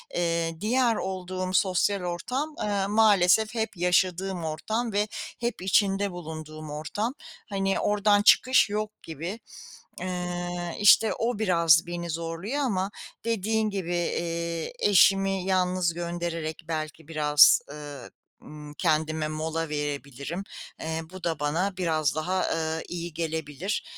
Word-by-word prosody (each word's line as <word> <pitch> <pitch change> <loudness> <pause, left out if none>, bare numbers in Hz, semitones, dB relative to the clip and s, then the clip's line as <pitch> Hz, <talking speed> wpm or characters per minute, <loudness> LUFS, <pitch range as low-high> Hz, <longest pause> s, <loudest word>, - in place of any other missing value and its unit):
Iıı, 165 -1 -1
diğer 235 +1 +2
olduğum 185 -1 -4
sosyal 190 +1 +2
ortam, 250 - -3
ııı, 200 -2 0
maalesef 215 0 +4
hep 220 -3 -2
yaşadığım 180 0 +1
ortam 220 +10 -2
ve 210 +1 +1 0.3
hep 235 -5 -3
içinde 195 +1 +2
bulunduğum 155 -3 -8
ortam. 205 - -3 0.4
Hani, 195 -1 0
oradan 205 0 +3
çıkış 255 +1 +5
yok 210 0 -2
gibi. 165 +7 -6 0.6
Iıı, 175 -1 -3
işte, 210 +2 +6
o 230 -1 -2
biraz 170 -5 +4
beni 170 0 -4
zorluyor 165 - -3
ama 195 -4 -1 0.3
dediğin 220 -1 0
gibi, 180 -3 -3
iii, 170 -1 -2
eşimi 195 -1 +4
yalnız 185 -2 +1
göndererek 170 -2 -4
belki 155 -1 -4
biraz, 150 -2 +6
ııı, 145 -1 -9 0.3
ımm, 150 -1 -11
kendime 155 -1 0
mola 160 +1 -3
verebilirim. 145 +3 -4 0.4
Iıı, 160 0 -4
bu 185 0 -11
da 165 -3 -1
bana 175 +6 -1
biraz 155 -5 +1
daha, 180 +4 0
ııı, 160 0 -1
iyi 170 -1 -5
gelebilir. 160 +3 -3
175 Hz, 125 wpm, -27 LUFS, 160-200 Hz, 0.6 s, işte